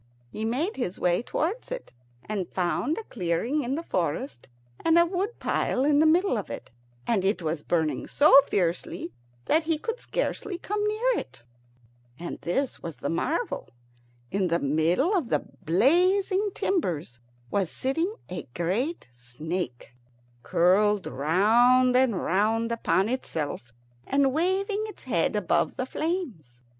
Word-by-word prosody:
He 220 - -4
made 275 - -1
his 240 -8 -3
way 175 +2 +2
towards 350 - -3
it, - - -6 0.3
and 200 -4 -3
found 190 - 0
a 450 - -4
clearing 225 - -1
in 255 +3 -1
the 330 - -4
forest, 145 - -3 0.4
and 330 0 +4
a 340 - +6
wood 380 +6 -2
pile 260 - 0
in 290 0 +4
the 315 - +5
middle 340 - +3
of 200 - -7
it, - - -7 0.3
and 215 -5 +1
it 190 -2 0
was 155 -1 -2
burning 160 -1 -1
so 285 -1 +7
fiercely 175 -2 -1 0.3
that 315 +1 +2
he 320 -1 +1
could 455 +9 -4
scarcely 420 -6 -3
come 415 +3 -2
near 460 +3 +1
it. 130 -2 -11 0.7
And 170 - -6
this 265 +10 -2
was 165 -3 -7
the - - -3
marvel, 325 - -2 0.6
that - - -4
in 190 - +2
the 170 0 +2
middle 165 - +2
of 315 -11 0
the - - +1 0.2
blazing 370 - +3
timbers 170 - -1 0.3
was 195 -4 +1
sitting 325 +9 -1 0.2
a 180 - -6
great 210 - -1
snake, 125 +2 -5 0.5
curled 195 - +3
round 235 - +4
and 250 -7 +3
round 220 +5 +1
upon 220 -4 +1
itself 155 - -4 0.4
and 275 -1 +2
waving 385 +6 0
its 425 - -11
head 195 -6 0
above 205 -5 +1
the 255 - -1
flames. 255 - -4
230 Hz, 150 wpm, -27 LUFS, -, 0.7 s, so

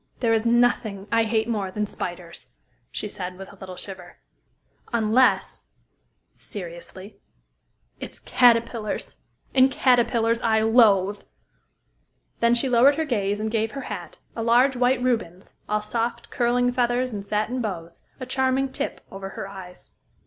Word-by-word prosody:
"There 230 -2 +2
is 225 +1 +1
nothing 230 -4 +2
I 230 -1 +3
hate 220 0 0
more 210 -5 -1
than 210 +2 -2
spiders," 175 -3 -6 0.4
she - - -4
said, 180 -2 -6
with 195 +1 -10
a - - -14
little 185 -1 -9
shiver, 185 -2 -10 0.7
"unless," 235 +2 +2 0.8
seriously, 185 +2 -9 0.8
"it's - - -8
caterpillars 230 -3 +1 0.3
and 260 0 +6
caterpillars 235 -3 +2
I 220 -1 +2
loathe." 205 -4 +4 1.2
Then 235 +1 +4
she 240 +3 +1
lowered 255 +3 +5
her 320 +1 -1
gaze, 205 -7 -1
and 215 0 -2
gave 220 -1 -1
her 275 - -5
hat - - -8 0.2
a 230 - -3
large 245 +4 +4
white 250 0 +2
Rubens, 210 -8 -2 0.2
all 210 0 0
soft, 235 +2 -3
curling 245 0 +2
feathers 245 0 0
and 200 -1 -4
satin 215 +5 -1
bows 170 -6 -5 0.2
a 255 - -5
charming 265 +1 0
tip - - -5
over 195 0 -7
her 195 - -6
eyes. 190 -2 -11
225 Hz, 140 wpm, -24 LUFS, 200-245 Hz, 1.2 s, and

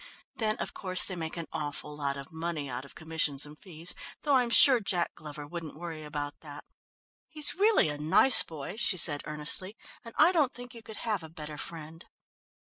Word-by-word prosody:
Then, 220 -4 -1
of - - -6
course, 185 -2 +3
they 185 - +3
make 160 -1 -6
an 165 - -5
awful 150 0 -6
lot 140 -1 -3
of 140 0 -10
money 160 -2 -5
out 125 +1 -6
of - - -16
commissions 160 -3 +1
and 150 +1 -12
fees, 170 0 -6 0.3
though 290 - 0
I'm 250 -3 +2
sure 255 +2 +7
Jack 180 -5 -2
Glover 150 -1 -10
wouldn't 160 -1 -9
worry 165 -2 -8
about 145 -1 -6
that. 145 -2 -11 0.6
He's 305 -2 +1
really 415 - +2
a 145 0 -6
nice 160 - +6
boy," 160 +5 -8
she 215 -4 +2
said 145 -4 +7
earnestly, 150 +7 +1 0.3
"and 230 - -13
I 355 - +5
don't 300 -7 0
think 245 0 -10
you 230 - -12
could 220 -1 -11
have 210 -5 -2
a 160 - -11
better 150 -2 -10
friend." 165 0 -10
165 Hz, 200 wpm, -28 LUFS, 150-215 Hz, 0.6 s, sure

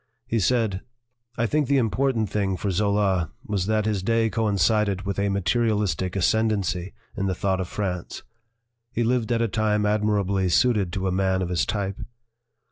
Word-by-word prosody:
He 115 - 0
said: 110 -3 +1 0.6
"I 120 - +1
think 145 +3 +1
the 140 - +3
important 120 -1 +1
thing 100 -3 -1
for 100 - -2
Zola 100 -3 +1 0.2
was 100 -6 -1
that 110 -1 +1
his 105 -3 0
day 115 +2 +1
coincided 105 -2 +1
with 100 0 -3
a 100 0 +1
materialistic 100 -3 0
ascendency 95 -3 0 0.2
in 100 -1 -1
the 95 - -1
thought 95 0 0
of 90 - -4
France. 90 -3 -4 0.7
He 120 - -1
lived 120 0 0
at 115 -1 +2
a - - +1
time 105 -1 0
ad 105 0 +1
mirably 100 -3 +1
suited 100 0 +2
to 95 -1 -1
a - - 0
man 95 0 +1
of 90 - -3
his 85 -3 0
type. 100 -2 -2
100 Hz, 175 wpm, -24 LUFS, 95-110 Hz, 0.7 s, the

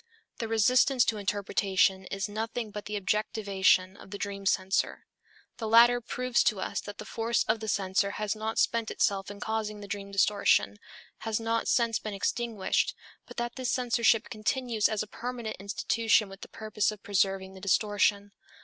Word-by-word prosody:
The 230 - -2
resistance 245 +3 +4
to 220 - 0
interpretation 195 -1 +1
is 195 +2 -3
nothing 220 +1 -4
but 210 0 -7
the 210 0 -3
objectivation 195 -2 +1
of - - -14
the 200 - -6
dream 200 -1 -4
censor. 190 0 0 0.5
The 225 - -4
latter 240 +2 +6
proves 250 +1 0
to 210 - +2
us - - -3
that 205 0 -9
the 215 - -8
force 230 +1 0
of 220 +1 0
the 220 - -6
censor 195 -1 +1
has 210 0 -1
not 220 +1 -4
spent 230 -1 +1
itself 195 -2 0
in 205 0 -9
causing 215 -1 -3
the 205 - -9
dream 200 0 -5
distortion, 200 +1 +2 0.4
has 220 0 -2
not 230 0 -1
since 230 -2 +2
been 215 -2 -5
extinguished, 220 0 -1 0.3
but - - -12
that 240 +2 -3
this 255 -2 -2
censorship 235 -2 +2
continues 230 0 0
as 215 -1 -1
a - - -10
permanent 235 0 -5
institution 215 +2 +1
with 195 0 -12
the - - -9
purpose 215 -2 -1
of 210 -2 -11
preserving 195 -1 0
the 190 - -12
distortion. 205 +1 +1
215 Hz, 175 wpm, -29 LUFS, 200-230 Hz, 0.5 s, latter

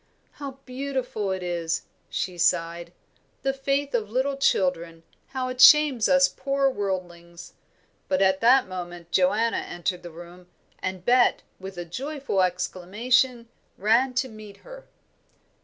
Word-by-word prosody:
"How 275 -2 -8
beautiful 255 -5 -3
it 190 -1 -3
is!" 170 -2 -2 0.3
she 185 - -3
sighed. 170 0 0 0.5
"The 270 - +1
faith 275 +1 -1
of 220 -4 -1
little 260 +4 0
children, 170 -10 0 0.2
how 260 -1 -3
it 255 0 -3
shames 290 -6 +7
us 275 0 +5
poor 275 -1 0
worldlings!" 175 -5 -5 0.5
But 280 - +1
at 190 0 +2
that 250 +1 +5
moment 175 -2 -8
Joanna 205 +6 +2
entered 175 +1 -4
the 175 - -9
room, 175 +2 -13 0.3
and 185 -1 -5
Bet, 245 0 +3 0.2
with 190 -1 -9
a 175 - -5
joyful 270 - -3
exclamation, 220 +7 0 0.3
ran 235 +5 +2
to 260 +1 +1
meet 215 -3 -12
her. - - -12
210 Hz, 135 wpm, -25 LUFS, 180-265 Hz, 0.5 s, shames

